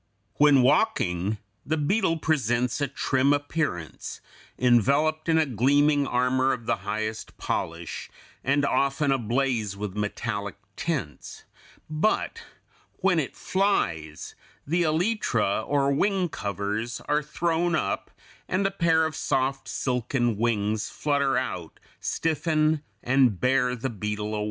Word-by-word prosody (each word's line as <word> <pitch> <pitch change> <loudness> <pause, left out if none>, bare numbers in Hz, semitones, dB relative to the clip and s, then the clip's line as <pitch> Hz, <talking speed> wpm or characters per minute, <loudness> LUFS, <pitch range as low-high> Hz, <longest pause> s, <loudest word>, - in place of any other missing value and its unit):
When 145 -3 +6
walking 105 - +2 0.3
the 155 +4 -1
beetle 165 +2 +1
presents 125 -5 0
a 140 - +2
trim 135 +1 +2
appearance, 145 - -3 0.4
enveloped 140 +7 +3
in 160 - +4
a 160 - +4
gleaming 145 +4 +3
armor 130 +1 +2
of 120 -2 -6
the - - +1
highest 110 +1 -4
polish, 85 0 -4 0.3
and 140 +2 +2
often 140 +1 +1
ablaze 120 -4 0
with 105 -1 -5
metallic 105 0 -3 0.2
tints, 140 - -4 0.4
but 155 +8 0 0.5
when 190 -3 +2
it 140 - -3
flies 85 - -1 0.3
the 170 +5 +1
elytra, 155 - +1
or 140 -1 +2
wing 185 +4 +1
covers, 105 -2 -3
are 150 +1 0
thrown 165 +3 0
up, 100 -10 -2 0.4
and 190 +2 0
a 195 - +2
pair 165 -4 +3
of 160 -1 -3
soft, 135 +1 -1
silken 125 -2 0
wings 105 -1 0
flutter 140 -3 +1
out, 90 -10 -4 0.2
stiffen, 155 -1 +1 0.2
and 125 -6 +3
bear 125 -1 +2
the 130 +2 -3
beetle 105 0 -3
away. 105 - -1
135 Hz, 120 wpm, -26 LUFS, 110-155 Hz, 0.5 s, When